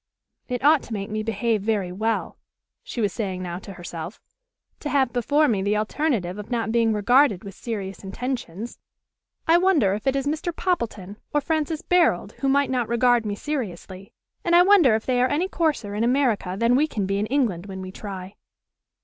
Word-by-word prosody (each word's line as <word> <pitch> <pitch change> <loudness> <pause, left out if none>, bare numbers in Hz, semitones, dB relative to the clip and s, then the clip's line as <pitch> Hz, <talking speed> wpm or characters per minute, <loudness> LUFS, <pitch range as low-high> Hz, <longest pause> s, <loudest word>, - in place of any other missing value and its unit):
"It 250 -1 -3
ought 300 -1 +6
to 230 - -7
make 200 0 -4
me 215 0 -1
behave 225 0 0
very 200 -4 -1
well," 220 +5 -2 0.4
she - - -5
was 205 -3 0
saying 190 -4 -3
now 175 0 -4
to 195 +1 -10
herself, 175 +1 -7 0.6
"to 295 - -4
have 265 -5 +2
before 290 +5 +2
me 210 -7 +1
the 205 +2 +1
alternative 215 - -1
of 210 - -8
not 230 -2 -1
being 230 -1 +3
regarded 215 0 +3
with 200 -1 -8
serious 200 -3 -6
intentions. 230 0 -5 0.7
I 335 +2 +6
wonder 320 - +3
if 210 +5 -4
it 270 - +3
is 275 0 -1
Mr. 315 +3 -2
Poppleton 220 - -2 0.2
or - - +5
Francis 310 +1 -1
Barold 330 - +2
who 275 - +1
might 280 0 +2
not 245 -3 0
regard 235 -1 +3
me 205 - -2
seriously. 195 - -5 0.3
And 345 -3 +3
I 350 - +8
wonder 360 - +6
if 220 - -3
they 250 -1 +1
are 255 - +3
any 325 +6 +1
coarser 305 - -1
in 210 +2 -1
America 240 -7 +1
than 230 +3 +3
we 295 +4 +3
can 210 -9 -2
be 195 +1 -1
in 210 - -1
England 220 -9 0
when 190 -1 -6
we 185 - -7
try." 195 -1 -8
230 Hz, 195 wpm, -24 LUFS, 200-280 Hz, 0.7 s, I